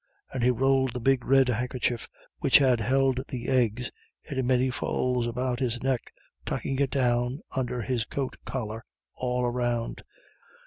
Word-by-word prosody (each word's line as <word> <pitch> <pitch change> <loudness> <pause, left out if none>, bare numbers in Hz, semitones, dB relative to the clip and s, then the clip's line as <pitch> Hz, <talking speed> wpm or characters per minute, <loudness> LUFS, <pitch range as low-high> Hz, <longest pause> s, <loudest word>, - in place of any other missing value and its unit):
And 130 - -2
he 125 - +4
rolled 130 +1 +2
the 125 - -3
big 130 0 +2
red 135 0 +5
handkerchief 125 0 -1 0.3
which - - +6
had 130 -4 +4
held 130 +3 +2
the 125 -2 -5
eggs 125 -2 +1 0.3
into 135 -3 -2
many 130 0 +2
folds 125 -1 0
about 125 +1 -1
his 120 -2 -1
neck, 130 -3 -1 0.3
tucking 135 -1 -2
it 140 -1 +2
down 125 +1 +1
under 125 -2 -1
his 120 -1 0
coat 135 -2 -3
collar 115 -3 -4 0.3
all 125 -1 -1
round. 120 -1 -1
125 Hz, 150 wpm, -27 LUFS, 120-130 Hz, 0.3 s, which